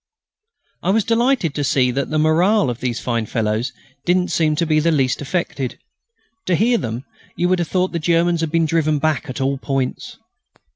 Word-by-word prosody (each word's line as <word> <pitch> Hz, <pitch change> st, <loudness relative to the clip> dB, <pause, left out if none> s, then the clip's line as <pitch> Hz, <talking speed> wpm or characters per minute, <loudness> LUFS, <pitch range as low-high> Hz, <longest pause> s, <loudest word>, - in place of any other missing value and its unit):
I -, -, -1 dB
was 215 Hz, +2 st, +3 dB
delighted 230 Hz, -, +1 dB
to 145 Hz, -, -2 dB
see 130 Hz, -2 st, +2 dB
that 135 Hz, +2 st, -2 dB
the 155 Hz, -, -1 dB
moral 155 Hz, -, +3 dB
of 120 Hz, -, -7 dB
those 120 Hz, -2 st, -2 dB
fine 115 Hz, -3 st, -2 dB
fellows 110 Hz, +2 st, -1 dB, 0.3 s
didn't 180 Hz, +1 st, +1 dB
seem 155 Hz, -2 st, +2 dB
in 155 Hz, -2 st, +2 dB
the 170 Hz, -, +3 dB
least 135 Hz, -4 st, +1 dB
affected. 145 Hz, -4 st, -3 dB, 0.7 s
To 180 Hz, -, +3 dB
hear 230 Hz, +5 st, +2 dB
them 115 Hz, +4 st, -4 dB, 0.3 s
you 175 Hz, -, +1 dB
would 185 Hz, -1 st, +2 dB
have 170 Hz, -, -1 dB
thought 185 Hz, 0 st, 0 dB
the 170 Hz, -, -2 dB
Germans 170 Hz, +1 st, +2 dB
had 165 Hz, -, -1 dB
been 165 Hz, +1 st, +2 dB
driven 155 Hz, -1 st, +1 dB
back 155 Hz, 0 st, -1 dB
at 130 Hz, -, -5 dB
all 135 Hz, 0 st, 0 dB
points. 135 Hz, -2 st, -3 dB
155 Hz, 190 wpm, -20 LUFS, 135-175 Hz, 0.7 s, was